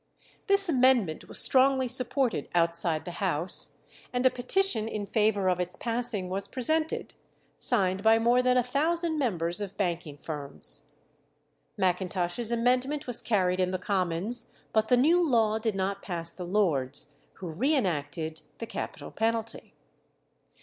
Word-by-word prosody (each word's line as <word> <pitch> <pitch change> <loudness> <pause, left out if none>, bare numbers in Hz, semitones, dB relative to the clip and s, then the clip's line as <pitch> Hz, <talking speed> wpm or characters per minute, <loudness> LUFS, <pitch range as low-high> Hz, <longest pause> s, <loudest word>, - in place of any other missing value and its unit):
This 395 -1 +3
amendment 255 - +2
was - - -6
strongly 265 0 +3
supported 255 0 0
outside 170 -1 0
the 175 +1 -8
House, 175 -1 +1 0.3
and 250 +1 -1
a 260 - +6
petition 250 - +1
in 210 -2 -4
favour 210 -2 +1
of 180 -1 +1
its 180 0 -2
passing 230 -5 -2
was 195 +2 -3
presented, 315 +5 -1 0.4
signed 190 -5 +1
by 220 +1 +5
more 240 +2 +3
than 250 0 +3
a 250 - +3
thousand 315 +5 0
members 175 - -1
of 200 -2 -6
banking 170 -6 -2
firms. 145 -1 -4 0.9
Macintosh's 185 +3 0
amendment 250 +5 +1
was 245 -2 +1
carried 185 -5 +1
in 185 -1 +2
the 185 - -2
Commons, 195 +4 -2 0.2
but 220 0 +2
the 250 - +4
new 325 +8 +4
law 225 -7 +2
did 220 -2 -1
not 195 +1 -2
pass 170 -3 -4
the 180 0 -8
Lords, 150 -9 +3 0.2
who 185 - -8
re 255 - +1
enacted 160 - -2 0.2
the 230 - -5
capital 230 - -6
penalty. 225 0 -3
215 Hz, 145 wpm, -28 LUFS, 180-250 Hz, 0.9 s, a